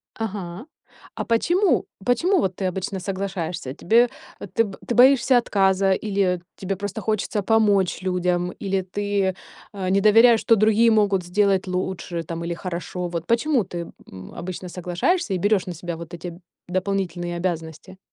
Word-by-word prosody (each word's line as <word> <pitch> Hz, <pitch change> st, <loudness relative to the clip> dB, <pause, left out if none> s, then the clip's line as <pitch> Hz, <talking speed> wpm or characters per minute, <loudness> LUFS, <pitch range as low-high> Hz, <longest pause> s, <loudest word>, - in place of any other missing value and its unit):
Ага. 200 Hz, -2 st, -5 dB, 0.5 s
А -, -, -3 dB
почему, 345 Hz, -, +2 dB, 0.2 s
почему 345 Hz, -, +2 dB
вот 190 Hz, -2 st, -1 dB
ты 195 Hz, -, -2 dB
обычно 190 Hz, +1 st, -3 dB
соглашаешься? 180 Hz, -6 st, -4 dB
Тебе 230 Hz, -, +3 dB, 0.4 s
ты 230 Hz, -, +3 dB
б 195 Hz, -2 st, -9 dB
ты -, -, -2 dB
боишься 255 Hz, +1 st, +6 dB
отказа 195 Hz, -4 st, +2 dB
или 195 Hz, -3 st, 0 dB, 0.2 s
тебе 195 Hz, 0 st, -3 dB
просто 205 Hz, +2 st, -5 dB
хочется 215 Hz, 0 st, -1 dB
помочь 205 Hz, -4 st, +2 dB
людям, 180 Hz, -1 st, 0 dB
или 195 Hz, -1 st, -2 dB
ты, 200 Hz, 0 st, -1 dB, 0.4 s
э, 190 Hz, -2 st, -3 dB
не 195 Hz, +1 st, +3 dB
доверяешь, 225 Hz, +2 st, +6 dB
что 230 Hz, -, +4 dB
другие 220 Hz, +2 st, +4 dB
могут 205 Hz, -4 st, +2 dB
сделать 195 Hz, +1 st, +1 dB
лучше 180 Hz, -2 st, -3 dB
там 165 Hz, +1 st, -5 dB
или 170 Hz, 0 st, -2 dB
хорошо? 180 Hz, +1 st, -5 dB
Вот 170 Hz, -1 st, -4 dB
почему 235 Hz, -, +2 dB
ты, 170 Hz, -2 st, -6 dB, 0.2 s
м, 95 Hz, -1 st, -11 dB
обычно 180 Hz, +1 st, -6 dB
соглашаешься 180 Hz, -, -1 dB
и 185 Hz, -, 0 dB
берешь 205 Hz, +1 st, +1 dB
на 180 Hz, -, -5 dB
себя 170 Hz, +1 st, -5 dB
вот 170 Hz, +1 st, -10 dB
эти 175 Hz, 0 st, -7 dB, 0.3 s
дополнительные 180 Hz, -2 st, -2 dB
обязанности? 170 Hz, 0 st, -4 dB
190 Hz, 155 wpm, -23 LUFS, 175-215 Hz, 0.5 s, боишься